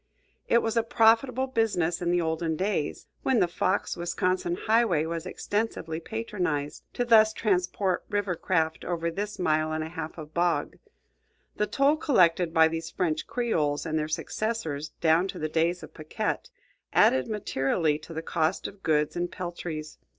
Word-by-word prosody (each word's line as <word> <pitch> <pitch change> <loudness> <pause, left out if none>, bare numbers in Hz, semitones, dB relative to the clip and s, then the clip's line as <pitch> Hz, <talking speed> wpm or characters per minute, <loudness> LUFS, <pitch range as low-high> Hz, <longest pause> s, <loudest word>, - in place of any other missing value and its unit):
It 235 - +4
was 225 +1 -1
a 230 - +4
profitable 230 +3 +3
business 200 -9 0
in 175 - 0
the 175 0 +2
olden 160 0 -1
days, 185 -3 -2 0.2
when 260 -3 +2
the 180 - +3
Fox 185 +3 0
Wisconsin 175 0 -1
highway 215 -7 +2
was 165 +1 -4
extensively 205 -7 -2
patronized, 180 -8 -3
to 245 - 0
thus 220 -2 +6
transport 185 -2 0
river 205 -3 0
craft 160 -2 0
over 170 -1 -2
this 205 +4 -4
mile 155 -2 +1
and 155 0 -1
a 160 - -6
half 160 -1 -6
of 155 -1 -9
bog. 175 0 0 0.8
The 210 - +1
toll 280 +6 +3
collected 180 - +3
by 160 -1 +6
these 165 0 -4
French 160 -4 -1
creoles 155 -12 0
and 160 -1 0
their 155 - -1
successors 155 -4 -3
down 165 +2 +4
to - - -6
the 155 - -2
days 170 +3 0
of - - -11
Paquette 155 -1 -3 0.4
added 130 0 +4
materially 155 -6 0
to - - -12
the 160 0 -5
cost 165 +2 0
of 200 0 -7
goods 150 -3 +1
and 175 0 -2
peltries. 170 -3 -6
175 Hz, 165 wpm, -27 LUFS, 160-210 Hz, 0.8 s, thus